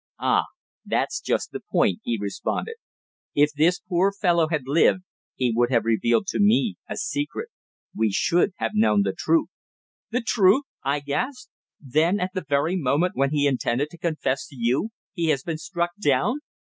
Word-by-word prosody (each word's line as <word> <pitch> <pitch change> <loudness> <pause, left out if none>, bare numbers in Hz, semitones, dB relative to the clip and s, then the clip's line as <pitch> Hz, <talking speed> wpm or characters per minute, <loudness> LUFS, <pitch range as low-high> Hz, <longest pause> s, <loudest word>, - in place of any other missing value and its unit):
"Ah! - - +2 0.4
that's - - -1
just - - -1
the - - -5
point," 90 - +2
he 115 - -1
responded. 100 - -3 0.6
"If 145 +1 +4
this 165 +5 +3
poor 185 +2 +2
fellow 175 -5 +2
had 155 -4 -1
lived 165 +6 +3 0.3
he 125 -2 +1
would 120 +1 +2
have 115 -3 +2
revealed 115 - +2
to - - -2
me 210 +1 +3
a - - -4
secret 150 - -3 0.5
we 110 0 +2
should 175 - +2
have - - -2
known 210 -1 +3
the - - -1
truth!" 330 -2 +1 0.6
"The 250 +2 -1
truth!" 225 +2 +4 0.2
I 140 +1 -1
gasped. 250 - -3 0.3
"Then 160 +8 +1
at 185 +1 -2
the 185 -3 -3
very 145 +5 +1
moment 165 +2 +1
when 140 0 +2
he 145 -1 +1
intended 135 +1 0
to 170 - -12
confess 155 -5 -1
to 140 - -15
you 125 - 0 0.2
he 170 -3 -1
has 140 -4 +1
been 160 -2 -4
struck 175 -1 -2
down." 180 - +2
160 Hz, 170 wpm, -24 LUFS, 140-195 Hz, 0.6 s, If